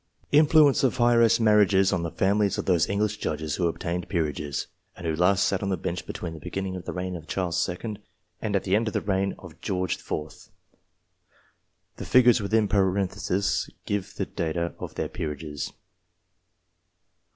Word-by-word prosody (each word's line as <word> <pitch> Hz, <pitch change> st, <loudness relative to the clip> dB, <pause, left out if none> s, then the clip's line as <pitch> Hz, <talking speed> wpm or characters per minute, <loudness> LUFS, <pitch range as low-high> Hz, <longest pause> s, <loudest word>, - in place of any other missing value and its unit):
Influence 150 Hz, -1 st, +5 dB
of 130 Hz, -, +1 dB
Heiress 120 Hz, -1 st, +5 dB
marriages 105 Hz, -3 st, +4 dB
on 90 Hz, -, 0 dB
the 85 Hz, -, -2 dB
Families 100 Hz, +3 st, +1 dB
of -, -, -3 dB
those 90 Hz, -4 st, +2 dB
English 105 Hz, +1 st, 0 dB
Judges 75 Hz, -4 st, -3 dB
who 85 Hz, -, +2 dB
obtained 85 Hz, +1 st, -3 dB
Peerages, 75 Hz, -5 st, -2 dB, 0.3 s
and 85 Hz, -, -8 dB
who 80 Hz, -1 st, 0 dB
last 90 Hz, +4 st, +3 dB
sat 95 Hz, -, 0 dB
on 100 Hz, -, -2 dB
the 95 Hz, -, 0 dB
Bench 85 Hz, 0 st, -4 dB
between 85 Hz, -2 st, -5 dB
the 80 Hz, -, -9 dB
beginning 95 Hz, +4 st, -4 dB
of 90 Hz, -1 st, -7 dB
the -, -, -3 dB
reign 90 Hz, 0 st, -4 dB
of 80 Hz, -2 st, -9 dB
Charles 90 Hz, -1 st, -1 dB
II. 105 Hz, +4 st, -5 dB, 0.4 s
and 105 Hz, -2 st, -1 dB
the 95 Hz, 0 st, +1 dB
end 115 Hz, +2 st, +1 dB
of 110 Hz, -, -3 dB
the -, -, +1 dB
reign 95 Hz, -1 st, 0 dB
of -, -, -13 dB
George 90 Hz, -2 st, -1 dB
IV. 75 Hz, 0 st, -6 dB, 1.5 s
(The -, -, -6 dB
figures 125 Hz, -2 st, +5 dB
within 105 Hz, +1 st, +2 dB
parentheses 95 Hz, -1 st, 0 dB, 0.2 s
give 100 Hz, 0 st, -3 dB
the 95 Hz, -, -2 dB
date 85 Hz, -4 st, -3 dB
of 85 Hz, 0 st, -4 dB
their -, -, -2 dB
peerages.) 75 Hz, -1 st, -5 dB
95 Hz, 170 wpm, -26 LUFS, 85-105 Hz, 1.5 s, Influence